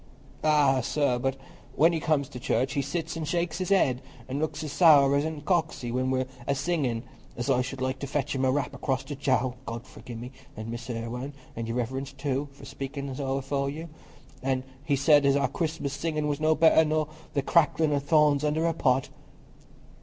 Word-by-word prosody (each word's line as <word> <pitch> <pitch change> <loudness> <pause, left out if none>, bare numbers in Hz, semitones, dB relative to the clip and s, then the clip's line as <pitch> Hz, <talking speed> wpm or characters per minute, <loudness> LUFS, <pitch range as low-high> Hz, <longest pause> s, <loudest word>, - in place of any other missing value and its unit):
"Ah, 145 -4 +4
sir, 125 -1 +1
but 135 +1 0 0.4
when 165 +2 +5
he 165 - 0
comes 150 -3 +1
to 125 - -9
church, 130 +1 0
he 140 - +1
sits 160 +4 -3
an' 165 - -3
shakes 170 +1 -1
his 185 - -2
head, 135 -10 +3 0.3
an' 135 +2 -3
looks 155 0 -2
as 150 - -4
sour 145 -5 +6
an' 155 +3 0
as 145 - -10
coxy 160 -8 0
when 130 +1 0
we're 130 0 +1 0.2
a 140 - +2
singin' 140 -7 -1 0.3
as 120 +3 0
I 125 -1 +3
should 130 0 -5
like 130 0 -1
to 140 - -4
fetch 145 0 -1
him 135 -1 -1
a 130 - +3
rap 135 -1 -1
across 135 -2 -1
the 150 - -6
jowl—God 130 -3 -1
forgi'e 120 -2 -10
me—an' 120 -2 -9
Mrs. 115 -1 -5
Irwine, 125 +4 -5 0.2
an' 115 0 -4
Your 115 - -3
Reverence 130 +3 -3
too, 140 +1 -2
for 140 0 -14
speakin' 140 0 -5
so 135 -1 -1
afore 140 0 -1
you. 160 +4 -6 0.5
An' 130 -1 0 0.2
he 145 -2 +1
said 145 +1 +5
as 140 0 +4
our 140 - +2
Christmas 160 -4 -3
singin' 150 0 -1
was 145 0 -1
no 155 0 +3
better 160 0 +6
nor 155 -1 0 0.3
the 140 - +1
cracklin' 160 -1 +3
o' 145 - +2
thorns 150 0 +3
under 155 +2 +1
a 165 - +2
pot." 130 -4 +1
140 Hz, 205 wpm, -27 LUFS, 130-155 Hz, 0.5 s, sour